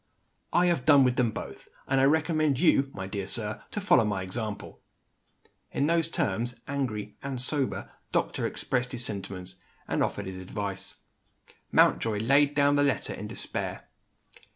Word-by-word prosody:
"I 175 - +4
have 170 -7 +1
done 145 -3 +7
with 125 -1 +2
them 125 -2 +3
both - - -8 0.2
and 135 0 +2
I - - +5
recommend 155 -2 +2
you, 140 -5 +4
my 95 -6 -6
dear 95 0 -4
sir, 105 0 -2
to - - -4
follow 195 - +4
my 100 -3 -1
example." 105 +2 -6 0.9
In 140 - 0
those 165 0 +2
terms 120 -3 -1
the 120 - -25
angry 110 -7 -3
(and 135 -2 -4
sober) 135 +1 +1 0.2
doctor - - 0
expressed 125 -1 -2
his 125 -1 +1
sentiments, 95 -3 -4 0.3
and - - 0
offered 100 - -1
his 95 0 -6
advice. 95 +1 -4 0.8
Mountjoy 110 -2 +3
laid 140 +6 +3
down 145 0 +4
the 145 - +4
letter 140 -2 +1
in - - -6
despair. - - -4
125 Hz, 160 wpm, -28 LUFS, 105-145 Hz, 0.9 s, done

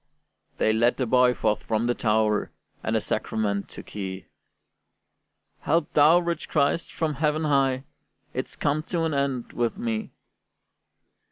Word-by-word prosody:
They 110 - +2
led 115 +2 +2
the 130 - 0
boy 125 +1 +4
forth 105 0 0
from 110 +1 -1
the 120 - +2
tower, 110 -2 +1 0.3
And - - -1
the - - +2
sacrament 100 -2 -1
took - - -11
he: 95 -2 -5 1.3
"Help 165 0 0
thou, 155 +3 +6
rich 170 -2 -2
Christ, 145 +2 +1
from 160 -2 -1
heaven 150 +2 0
high, 135 -3 +2 0.5
It's - - -4
come 145 +2 0
to 170 -2 0
an 160 -1 0
end 140 -3 -1
with 120 +5 -1
me!" 225 -1 -2
135 Hz, 145 wpm, -25 LUFS, 110-155 Hz, 1.3 s, thou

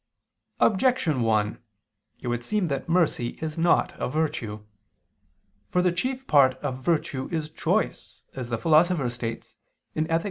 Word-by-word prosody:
Objection 205 - +2
1: 110 -2 +1 0.6
It - - -6
would 120 0 -1
seem 205 - 0
that 140 +3 -3
mercy 165 -8 +1
is 155 -1 -4
not 170 +1 +2
a - - -1
virtue. 125 -9 -2 1.0
For 180 - +2
the 180 - +3
chief 255 +9 -2
part 135 - +5
of 130 -3 -5
virtue 145 -5 0
is 155 -2 -2
choice - - -2
as 125 -3 -6
the 115 - -1
Philosopher 160 -2 +3
states 115 -2 -6 0.4
(Ethic. 165 +1 +1
150 Hz, 140 wpm, -26 LUFS, 120-170 Hz, 1.0 s, part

